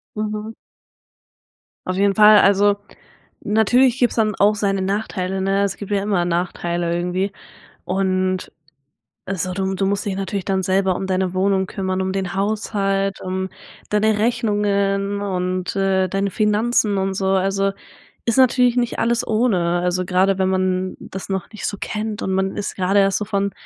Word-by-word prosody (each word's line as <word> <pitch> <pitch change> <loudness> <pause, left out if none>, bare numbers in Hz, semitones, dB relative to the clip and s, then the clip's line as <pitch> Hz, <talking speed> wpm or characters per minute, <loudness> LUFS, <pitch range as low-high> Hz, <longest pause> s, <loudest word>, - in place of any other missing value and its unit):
Mhm. 215 0 -4 1.3
Auf 185 - -2
jeden 200 0 +2
Fall. 210 +1 +7
Also, 200 +1 +4 0.6
natürlich 240 +4 +3
gibt 245 - +2
es - - -8
dann 215 -2 +1
auch 205 +2 +3
seine 195 -2 0
Nachteile, 190 -1 -2
ne? 195 +1 +1
Es 195 -1 -2
gibt 205 - -8
ja 200 -1 +1
immer 195 -4 +1
Nachteile 175 0 -1
irgendwie. 180 +3 -1 0.5
Und 185 0 -1 0.8
also, 185 -1 -2
du 190 0 -1
du 195 +1 0
musst 200 +1 -1
dich 195 -2 -2
natürlich 195 0 -3
dann 190 -1 0
selber 190 0 +1
um 190 - -4
deine 185 -1 0
Wohnung 190 0 +1
kümmern, 190 -1 -2
um 190 0 -2
den 190 -2 -3
Haushalt, 195 -1 -1
um 190 0 -3 0.4
deine 210 0 +2
Rechnungen 205 -3 0
und, 185 -2 -2
äh, 190 -1 +1
deine 195 +2 -1
Finanzen 210 0 +1
und 190 0 -1
so. 190 0 -1
Also, 195 +1 +1 0.5
ist 230 - +1
natürlich 250 -1 +4
nicht 240 -1 0
alles 235 +1 +1
ohne, 185 -7 +1
also 180 0 -1
gerade 190 +1 +2
wenn 190 0 +2
man 185 0 0
das 190 - -8
noch 190 -2 -3
nicht 215 - -5
so 205 - -3
kennt 215 +1 -4
und 190 - -2
man 190 +1 -1
ist 205 - -3
gerade 190 +2 +2
erst 195 0 +2
so 210 - -4
von 200 0 -1
195 Hz, 165 wpm, -20 LUFS, 185-210 Hz, 1.3 s, Fall